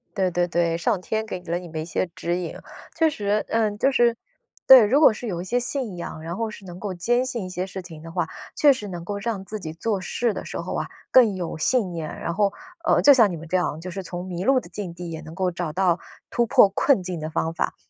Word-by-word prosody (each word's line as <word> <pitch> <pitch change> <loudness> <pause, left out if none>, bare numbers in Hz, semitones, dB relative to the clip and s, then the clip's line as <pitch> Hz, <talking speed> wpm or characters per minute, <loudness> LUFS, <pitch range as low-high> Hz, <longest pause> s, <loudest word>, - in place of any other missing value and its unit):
对 190 -3 +1
对 175 0 +1
对， 170 -1 +1
上 175 +3 0
天 220 +3 -2
给 200 -4 -5
了 175 0 -2
你 180 - -10
们 160 -1 -5
一 - - -5
些 170 +2 -1
指 175 +1 -1
引。 180 -2 -5 0.4
确 325 -1 +4
实， 210 -6 -1
嗯， 215 -2 +1
就 270 +6 +3
是 240 -3 +3 0.5
对， 260 -3 +11
如 255 +8 +3
果 300 - +7
是 235 +3 -7
有 175 -5 -3
一 - - -7
些 245 +6 +1
信 245 -6 -3
仰， 170 -2 -6
然 165 +2 -5
后 225 +2 -2
是 205 -2 -11
能 175 -1 -9
够 200 -2 -4
坚 240 +8 +1
信 235 -6 -3
一 - - -6
些 180 0 -3
事 190 0 -7
情 165 -4 -11
的 165 +1 -9
话， 165 -1 -1 0.3
确 290 -2 +6
实 215 -6 -6
能 175 -3 -7
够 205 +2 -3
让 205 -2 -3
自 215 +2 -5
己 160 -5 -6
做 195 +4 -2
事 230 +5 -1
的 - - -5
时 - - -5
候 - - -4
啊， - - -2 0.2
更 230 -6 +6
有 175 -3 -4
信 205 +3 +1
念。 165 -3 -5
然 170 - -3
后， 200 +2 +2 0.3
呃， - - +4
就 285 - +8
像 230 -6 +5
你 170 - -4
们 165 +1 -10
这 180 - -2
样， 170 -4 -1
就 180 +2 -7
是 195 +2 -5
从 180 0 -6
迷 180 -1 -4
路 265 +4 +4
的 - - -11
境 195 -5 -6
地 175 0 -7
也 160 -1 -6
能 160 +1 -10
够 185 +1 0
找 170 -2 -3
到 180 +1 +2 0.3
突 240 - +1
破 205 - +6
困 200 +1 +2
境 180 -2 -4
的 155 0 -4
方 160 0 -1
法。 - - -2
185 Hz, 290 characters per minute, -24 LUFS, 170-220 Hz, 0.5 s, 对